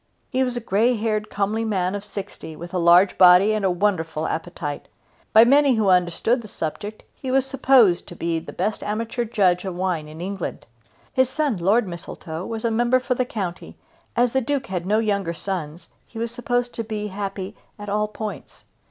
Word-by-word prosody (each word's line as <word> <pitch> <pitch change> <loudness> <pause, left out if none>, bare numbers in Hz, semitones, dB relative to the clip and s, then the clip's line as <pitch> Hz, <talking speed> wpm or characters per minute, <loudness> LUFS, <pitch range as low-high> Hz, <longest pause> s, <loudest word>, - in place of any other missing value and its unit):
He 260 -1 +2
was 250 -1 -2
a - - -3
grey 225 +3 +2
haired 215 -1 -1
comely 210 +3 -1
man 190 -4 0
of 205 0 -4
sixty, 200 -5 -7
with 175 +3 -9
a 180 - 0
large 175 +3 +5
body 185 +3 +7
and 215 -1 -1
a 190 - +3
wonderful 175 -4 0
appetite. 160 -3 -4 0.4
By 220 - +8
many 275 +1 +5
who 215 -3 +2
understood 180 +7 +2
the 220 - -10
subject 205 +5 -5
he 265 - -7
was 265 0 +3
supposed 265 -9 +4
to 175 - -9
be 165 -1 -1
the 160 - -10
best 205 +4 -2
amateur 230 +3 -2
judge 190 -5 +2
of 190 -2 -4
wine 180 -4 -1
in 155 +1 -11
England. 190 0 -5 0.5
His 260 -1 +3
son 280 -5 0
Lord 200 +6 +2
Mistletoe 170 -1 -7
was 225 0 -4
member 240 +2 +2
for 255 - -1
the 250 0 0
county 190 -7 -5 0.4
and 240 - +4
as 245 - 0
the 265 - +2
Duke 275 +1 -1
had 185 -4 -4
no 210 +2 +3
younger 200 -6 0
sons 170 -3 -5 0.2
he 230 - -12
was 230 0 -2
supposed 245 0 -1
to 230 - -3
be 210 -1 -4
happy 195 0 -5 0.2
at 205 -1 -9
all 210 +1 0
points. 210 -7 -7
205 Hz, 195 wpm, -23 LUFS, 180-235 Hz, 0.5 s, By